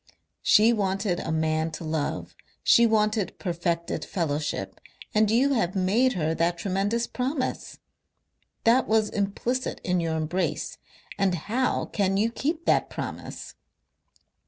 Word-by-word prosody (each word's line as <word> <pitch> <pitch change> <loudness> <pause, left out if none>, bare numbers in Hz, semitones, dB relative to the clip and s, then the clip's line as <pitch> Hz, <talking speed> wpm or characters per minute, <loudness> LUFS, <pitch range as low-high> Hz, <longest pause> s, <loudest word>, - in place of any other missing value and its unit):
"She 220 +3 +5
wanted 195 -3 0
a 160 - -3
man 160 0 0
to 165 - -6
love, 155 -2 -3 0.3
she 235 0 +6
wanted 215 -2 +1
perfected 170 -2 -2
fellowship, 145 - -3 0.3
and 215 0 +3
you 260 +6 +3
have 205 -7 0
made 215 +8 +3
her 160 -3 0
that 170 +1 0
tremendous 200 +5 0
promise. 260 +2 -3 0.9
That 240 +3 +4
was 220 -1 +2
implicit 220 +6 -2
in 180 -1 +1
your 165 -1 -1
embrace. 165 +4 -2 0.4
And 195 -2 +2
how 230 +10 -1
can 195 -2 0
you 220 +3 +2
keep 310 +7 -2
that - - +2
promise?" - - -6
195 Hz, 130 wpm, -26 LUFS, 170-230 Hz, 0.9 s, she